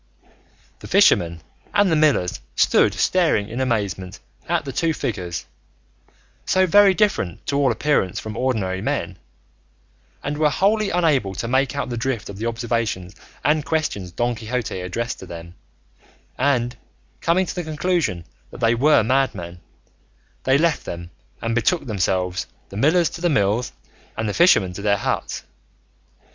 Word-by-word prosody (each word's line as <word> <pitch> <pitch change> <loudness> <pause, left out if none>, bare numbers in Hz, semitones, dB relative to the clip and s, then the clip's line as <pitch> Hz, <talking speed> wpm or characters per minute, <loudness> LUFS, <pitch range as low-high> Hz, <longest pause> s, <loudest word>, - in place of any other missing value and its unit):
The - - -10
fishermen 85 -1 +4 0.3
and 200 -3 +4
the - - +4
millers 150 -13 +2 0.2
stood - - +3
staring 165 - +2
in 120 +4 -3
amazement 100 -6 -2 0.3
at 170 -3 0
the 135 - -5
two 165 +2 0
figures, 90 - -4 1.0
so 185 0 +3
very 195 +2 +6
different 195 - 0
to 140 - 0
all 140 -2 +3
appearance 140 -12 0
from 110 -1 -7
ordinary 105 -8 -1
men, 95 -9 -2 1.0
and 145 +1 -3
were 155 -1 +4
wholly 205 +5 +2
unable 150 - +1
to 115 - -3
make 130 +3 +1
out 140 - -2
the 120 - -3
drift 120 -2 -2
of 100 0 -8
the 115 - -2
observations 115 -5 -2 0.3
and 150 +1 +3
questions 140 - -2
Don 120 +7 0
Quixote 115 -2 -3
addressed 115 +7 -3
to 95 - -10
them; 85 0 -9 0.8
and 125 -2 +1 0.4
coming 175 +3 +2
to - - -5
the 180 - -3
conclusion 155 - -1 0.2
that - - -11
they 115 0 +3
were 140 +1 +4
madmen, 105 -9 -1 0.9
they 130 +1 +4
left 165 0 +1
them 85 0 -7 0.3
and 115 0 0
betook 140 +8 +1
themselves, 95 -4 -1 0.2
the - - -10
millers 160 - +3
to 170 - -8
their 175 - +2
mills, 115 -4 +1 0.5
and 110 0 -1
the 105 - -1
fishermen 100 - +4
to 100 - -7
their 100 -1 +2
huts. - - -2
120 Hz, 155 wpm, -22 LUFS, 95-155 Hz, 1.0 s, very